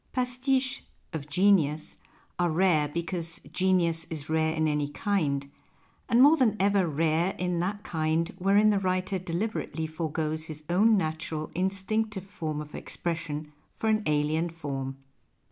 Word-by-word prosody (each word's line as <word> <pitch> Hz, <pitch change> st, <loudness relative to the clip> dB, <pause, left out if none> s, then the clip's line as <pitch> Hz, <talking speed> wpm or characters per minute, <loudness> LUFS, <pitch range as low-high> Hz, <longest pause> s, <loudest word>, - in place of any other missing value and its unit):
Pastiches 255 Hz, +1 st, 0 dB, 0.2 s
" -, -, -41 dB
of 150 Hz, -2 st, -5 dB
genius 160 Hz, -3 st, +2 dB, 0.2 s
" -, -, -34 dB
arc 175 Hz, -3 st, +1 dB
rare 170 Hz, -5 st, +3 dB
because 170 Hz, +1 st, -3 dB
genius 175 Hz, -3 st, +2 dB
is 155 Hz, -1 st, -5 dB
rare 160 Hz, 0 st, +2 dB
in 160 Hz, 0 st, +1 dB
any 150 Hz, -1 st, 0 dB
kind, 145 Hz, -4 st, -1 dB, 0.6 s
and 240 Hz, +2 st, +6 dB
more 300 Hz, +3 st, +7 dB
than 230 Hz, -6 st, +3 dB
ever 195 Hz, -1 st, +3 dB
rare 160 Hz, +4 st, +1 dB
in 180 Hz, -1 st, -1 dB
that 200 Hz, +4 st, -2 dB
kind 160 Hz, +1 st, 0 dB
wherein 200 Hz, +3 st, +5 dB
the 200 Hz, -, +2 dB
writer 185 Hz, 0 st, 0 dB
deliberately 175 Hz, -3 st, -3 dB
forgoes 155 Hz, 0 st, -2 dB
his 155 Hz, -1 st, -8 dB
own 210 Hz, +4 st, +5 dB
natural, 160 Hz, -2 st, -3 dB
instinctive 195 Hz, +2 st, -1 dB
form 155 Hz, -6 st, -4 dB
of 150 Hz, 0 st, -10 dB
expression 155 Hz, -3 st, -4 dB, 0.2 s
for 220 Hz, -, -1 dB
an 215 Hz, 0 st, +3 dB
alien 150 Hz, +3 st, +1 dB
form. 135 Hz, -5 st, -5 dB
170 Hz, 145 wpm, -28 LUFS, 155-195 Hz, 0.6 s, more